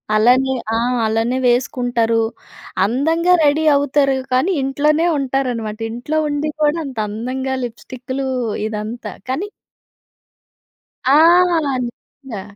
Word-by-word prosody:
అలానే 250 +5 +4 0.2
ఆ! - - +2 0.3
అలానే 225 +3 0
వేసుకుంటారు. 240 -2 +1 0.6
అందంగా 325 - +2
రెడీ 295 +2 +2
అవుతారు. 280 -1 +2 0.2
కానీ 260 +9 +2
ఇంట్లోనే 300 +4 +1
ఉంటారనమాట. 250 -5 -2
ఇంట్లో 245 +7 -3
ఉండి 290 +1 -1
కూడా 300 +2 +3
అంత 265 -4 -8
అందంగా 255 +5 -3
లిప్‌స్టిక్‌లు 255 +3 -5 0.4
ఇదంతా. 220 +2 -5 0.2
కానీ 320 +11 -2 1.6
ఆ! 270 - +4 0.7
నిజంగా. 240 -2 -9
260 Hz, 95 wpm, -18 LUFS, 235-285 Hz, 1.6 s, అలానే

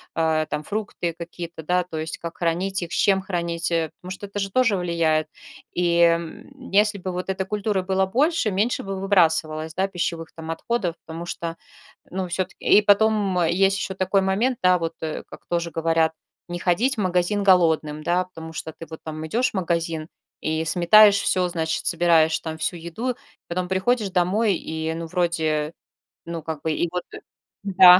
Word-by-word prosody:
а, 160 -1 +2
там 150 - -3
фрукты 200 -4 -3
какие-то, 170 -1 -7
да, 180 +3 +1
то 170 -3 -7
есть 160 0 -4
как 170 0 -7
хранить 180 +3 0
их, 170 - -7
с - - -2
чем 195 -1 +3
хранить, 170 -3 -2
э. 165 -1 +1
Потому 180 +1 -8
что 195 +2 -6
это 200 +1 -5
же 195 -1 -2
тоже 230 -3 +3
влияет. 165 -3 +1 0.5
И, 170 -1 +2
м, 170 +11 0
если 210 +1 +3
бы 185 0 -4
вот 180 +1 -4
эта 190 0 -1
культура 205 0 -1
была 190 +1 +1
больше, 260 - +1
меньше 210 +6 0
бы 195 -1 -4
выбрасывалось, 160 -5 +2
да, 190 +3 0
пищевых 170 -3 -3
там 160 0 -6
отходов, 175 +1 -2
потому 165 +1 -6
что, 170 -1 -4 0.6
ну, 185 0 -2
всё-таки. 180 +1 -3
И 210 - +7
потом, 205 -2 +3
м, 170 - +3
есть 195 +2 +3
еще 190 - -3
такой 190 +1 +2
момент, 210 +7 +1
да, 180 0 +5
вот, 165 -1 -2
э, 155 -1 -4
как - - -13
тоже 170 -1 -1
говорят: 165 0 +2 0.4
"Не 175 - -4
ходить 210 +11 +2
в 220 - -6
магазин 185 +2 +1
голодным". 160 -5 +3
Да, 180 +3 +1
потому 160 -3 -10
что 160 0 -6
ты 165 - -8
вот 160 - -8
там 155 0 -5
идешь 240 +10 +1
в - - -33
магазин 165 -3 -1 0.3
и 160 +1 -1
сметаешь 200 +5 +6
всё, 185 -2 +1
значит, 160 -2 -2
собираешь 165 -2 +4
там 160 -1 -6
всю 165 - -1
еду, 170 +10 -3
и - - -7 0.3
потом 180 +1 -2
приходишь 195 +4 +1
домой 195 +4 +2
и, 160 0 -3
ну, 165 0 -4
вроде. 160 -3 0 0.5
Ну, 170 -1 -5
как 160 -2 -5
бы, 160 - -1
и 170 +2 0
вот, 180 0 -2
э, - - -7 0.4
да. 185 -2 +8
175 Hz, 190 wpm, -23 LUFS, 165-195 Hz, 0.6 s, да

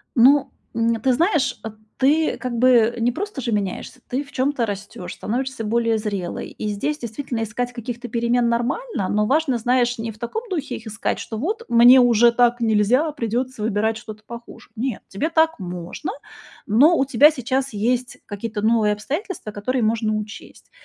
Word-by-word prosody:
Ну, 270 +3 +5 0.2
н 230 0 +1
ты 260 +2 +3
знаешь, 295 -2 +1 0.4
ты 300 +4 +2
как 250 -2 -4
бы 240 -1 +4
не 235 +1 +1
просто 375 - -5
же 235 - -2
меняешься, 205 +4 -3
ты 260 +3 -2
в 280 - -18
чём-то 260 -2 0
растёшь, 200 -3 -6
становишься 260 +1 -3
более 230 +1 +1
зрелой. 200 -5 -4
И 215 - -1
здесь, 210 +9 -2
действительно, 235 0 -4
искать 245 +3 -3
каких-то 240 0 -6
перемен 235 +1 +1
нормально, 240 - -1
но 210 0 +1
важно, 275 +1 +1
знаешь, 245 +1 +1
не 225 0 -3
в 215 - -16
таком 240 - -4
духе 295 -8 -3
их 225 - -12
искать, 220 +2 -2
что 220 - -6
вот: 420 - -2
"Мне 240 +2 +8
уже 235 -1 +5
так 240 0 +2
нельзя, 230 +7 +2
придётся 250 -2 -3
выбирать 220 +1 +1
что-то 215 -1 -10
похуже". 235 0 -11
Нет, 245 -1 -2
тебе 210 +12 -2
так 320 -3 +2
можно, 180 - -5 0.6
но 270 +11 +5
у - - +3
тебя 280 +4 +6
сейчас 265 -1 -2
есть 245 +5 -1
какие-то 210 +1 -5
новые 215 -1 +3
обстоятельства, 295 - -5
которые 240 +5 -2
можно 220 0 +1
учесть. 215 0 -8
235 Hz, 170 wpm, -22 LUFS, 220-265 Hz, 0.6 s, Мне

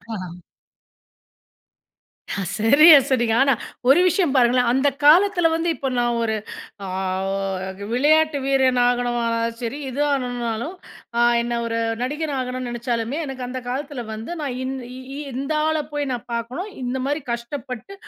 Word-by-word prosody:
ஆஹ. 180 -4 -7 2.0
ஹ 200 - -2 0.2
சரியா 295 +9 +8
சொன்னீங்க. 240 -4 +2
ஆனா, 275 0 +4 0.4
ஒரு 275 - +7
விஷயம் 355 -3 +2
பாருங்களேன், 245 -1 +4
அந்த 265 +3 +2 0.2
காலத்தில 350 +3 +6
வந்து 330 +1 0
இப்ப 270 - -3
நான் 240 0 +1
ஒரு 220 -1 0 0.5
அ - - -5 0.9
க - - -10
விளையாட்டு 310 +4 +3
வீரன் 265 -2 +3
ஆகணுமானாலும் 235 -2 0
சரி, 245 +4 -4
இது 265 +3 -3
ஆகணுனாலும், 245 +1 -2 0.4
அ - - +3 0.2
என்ன 235 0 -2
ஒரு 230 0 -2 0.2
நடிகனா 295 +3 -2
ஆகணும்னு 255 0 -4
நினைச்சாலுமே, 240 +2 -2
எனக்கு 265 -2 -5
அந்த 255 +1 -4
காலத்தில 275 0 -4
வந்து, 220 +7 -7
நான் 275 -4 -3
இந் 265 +1 -3 0.2
இ 260 +2 -8
இந்த 275 +4 -3
ஆள 315 0 +1 0.2
போய் 290 -2 -2
நான் 240 - -5
பாக்கணும், 250 - -4
இந்த 250 +1 -2
மாரி 290 +2 -1
கஷ்டப்பட்டு, 245 - -6
255 Hz, 145 wpm, -22 LUFS, 235-290 Hz, 2.0 s, சரியா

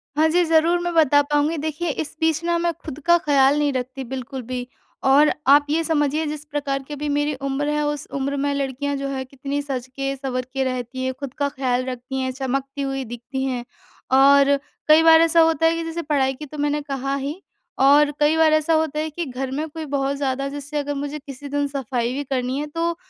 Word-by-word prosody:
हाँ 310 +2 +4
जी, 350 +2 +3
ज़रूर 330 +2 +3
मैं 350 0 -2
बता 290 -3 +5
पाऊँगी 295 +2 0
देखिए 315 +3 -3
इस 310 - -7
बीच 320 0 +1
ना 340 0 +1
मैं 340 0 +1
खुद 300 -2 -6
का 345 0 +6
ख़याल 280 -3 +3
नहीं 290 -2 +1
रखती 260 +1 -4
बिल्कुल 260 +1 -6
भी 245 +1 -5 0.4
और 290 +3 +6 0.2
आप 290 +2 +6
ये 320 +2 +1
समझिए 310 -1 +1
जिस 300 0 -5
प्रकार 275 -2 -2
की 295 +2 -9
अभी 295 +1 -3
मेरी 290 +1 0
उम्र 275 +2 -1
है 300 0 0
उस 295 -1 -3
उम्र 275 0 -2
में 285 - +1
लड़कियाँ 280 +1 -2
जो 275 0 -3
है 270 -1 -3
कितनी 275 +2 -4
सज 260 -3 -4
के 275 0 -2
सँवर 255 -2 -3
के 270 -1 0
रहती 255 0 -3
हैं, 260 0 -1
खुद 280 -3 -6
का 285 -1 0
ख़याल 255 -2 -1
रखती 255 +1 -5
हैं, 260 0 -1
चमकती 275 +1 -3
हुई 270 -1 -2
दिखती 240 +3 -5
हैं 255 -2 -2 0.5
और 280 +1 +6 0.3
कई 310 +1 +7
बार 325 0 +7
ऐसा 330 0 +4
होता 325 0 +3
है 325 - +5
कि 330 - -3
जैसे 330 +1 -4
पढ़ाई 280 -4 +1
की 300 +3 -9
तो 300 +1 -10
मैंने 295 0 0
कहा 275 -1 -3
ही 285 +6 -4 0.4
और 290 +2 +5
कई 300 +2 +3
बार 315 -1 +5
ऐसा 310 +1 +2
होता 315 -1 +1
है 315 - -2
कि 335 +3 -4
घर 260 -1 -4
में 300 +4 -2
कोई 315 +1 -6
बहुत 275 -1 -1
ज़्यादा 275 -1 -1
जैसे 290 +1 -6
अगर 290 0 -2
मुझे 290 +2 -4
किसी 285 -1 -9
दिन 285 0 0
सफाई 250 -3 -2
भी 285 +2 -3
करनी 255 -1 -2
है, 295 - -2
तो 335 +2 -2
285 Hz, 225 wpm, -22 LUFS, 270-305 Hz, 0.5 s, कई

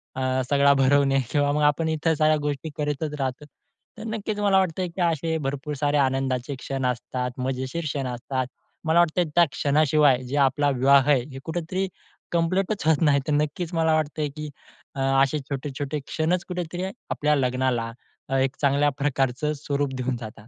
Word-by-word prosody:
अ, 130 0 0
सगळा 140 0 +5
भरवणे 135 0 +3
किंवा 145 -1 +2
मग 150 +1 0
आपण 160 +2 -2
इतर 160 +1 +1
साऱ्या 155 0 +3
गोष्टी 145 +1 -3
करतच 150 0 -2
राहतो. 135 +2 -3 0.5
तर 215 - -8
नक्कीच 215 -1 -3
मला 200 -2 +3
वाटतं 185 -1 -1
आहे 180 - -2
की 190 - -3
असे 165 -1 +1
भरपूर 140 +2 -3
सारे 145 +1 +1
आनंदाचे 135 0 0
क्षण 135 -1 -3
असतात, 125 0 -2
मजेशीर 130 +5 -3
क्षण 140 -3 -2
असतात, 125 +1 -3 0.4
मला 160 +2 +4
वाटतं 175 +1 +3
आहे 170 - -1
त्या 175 0 +7
क्षणाशिवाय 145 -2 +3
जे 125 +3 -5
आपला 145 +2 +1
विवाह 135 +2 +5
आहे 135 - +5
हे 135 - -7
कुठेतरी 175 +3 -2 0.4
कंप्लीटच 185 +4 0
होत 160 -1 +3
नाही. 145 -3 +4
तर 150 - +1
नक्कीच 150 +4 -1
मला 160 -1 +2
वाटतंय, 155 -1 -1
की 150 +1 -7 0.5
अ, 135 - -5 0.2
असे 150 +2 0
छोटे-छोटे 140 +1 -3
क्षणच 170 +3 0
कुठेतरी 180 0 -4 0.3
आपल्या 150 0 +1
लग्नाला 125 -3 0 0.4
अ, 135 - 0
एक 135 0 +1
चांगल्या 140 +1 +3
प्रकारचं 140 +1 0
स्वरूप 140 -1 -1
देऊन 125 -1 -2
जातात. 110 -2 -10
145 Hz, 175 wpm, -25 LUFS, 135-160 Hz, 0.5 s, त्या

